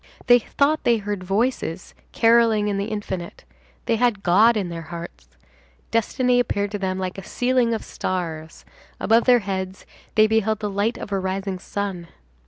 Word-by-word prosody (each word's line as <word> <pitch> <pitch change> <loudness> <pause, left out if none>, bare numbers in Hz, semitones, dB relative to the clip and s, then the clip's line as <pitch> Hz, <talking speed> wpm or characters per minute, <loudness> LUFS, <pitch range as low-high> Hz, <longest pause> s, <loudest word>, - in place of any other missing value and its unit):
They 245 -1 +7
thought 285 +6 0
they 235 -1 +3
heard 205 -2 -4
voices 195 -3 -2 0.2
carolling 225 -2 +4
in 200 -1 -1
the 200 - -1
infinite; 195 -5 -5 0.4
they 230 -2 +1
had 230 -4 +1
God 215 +6 +5
in 190 -4 -2
their 165 -1 -5
hearts; 170 0 -8 0.6
destiny 245 +2 +2
appeared 205 -4 -1
to 205 - -3
them 185 -1 -2
like 185 0 -4
a - - -9
ceiling 245 +2 +1
of 220 - -6
stars; 165 -4 -5 0.3
above 230 +1 +3
their 245 -2 +5
heads 190 -1 -4 0.3
they 215 - +6
beheld 220 -1 +1
the 210 -2 -3
light 205 +4 0
of - - -8
a 195 - 0
rising 190 0 -3
sun. 195 -3 -4
205 Hz, 170 wpm, -23 LUFS, 190-230 Hz, 0.6 s, They